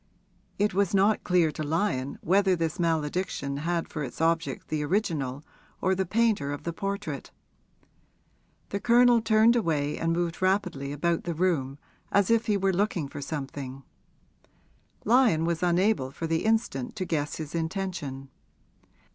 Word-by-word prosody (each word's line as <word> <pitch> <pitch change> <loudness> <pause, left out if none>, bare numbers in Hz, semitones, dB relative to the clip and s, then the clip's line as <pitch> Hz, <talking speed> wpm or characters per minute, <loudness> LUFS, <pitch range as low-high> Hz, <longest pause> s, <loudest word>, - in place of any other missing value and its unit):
It 205 -1 +1
was 200 0 +1
not 200 +3 +3
clear 175 -3 +3
to 155 - -6
Lyon 150 -3 -1
whether 190 +2 +3
this 165 +1 -2
malediction 160 -3 -1
had 165 +3 -1
for 150 - -5
its 130 - -7
object 165 0 0
the 155 -1 -1
original 150 -6 -1 0.4
or 190 - +2
the 190 -1 -1
painter 210 -9 +1
of 145 - -5
the 170 - -3
portrait. 195 -6 -4 1.4
The 200 - -2
Colonel 240 +1 +5
turned 220 +1 +4
away 150 -9 0
and 165 - 0
moved 170 0 -1
rapidly 185 -8 0
about 165 +4 -1
the 170 -1 -2
room, 150 -6 0 0.3
as 200 +1 +3
if 230 +1 +2
he 210 -2 +2
were 195 0 +1
looking 180 -6 0
for 140 - -7
something; 135 -2 -6 1.2
Lyon 225 -9 +4
was 170 -1 -1
unable 180 -4 +2
for 165 - -6
the 165 +2 -1
instant 220 - 0
to 185 - -3
guess 150 -4 -2
his 155 -2 -6
intention. 160 -6 -4
170 Hz, 150 wpm, -27 LUFS, 150-200 Hz, 1.4 s, Colonel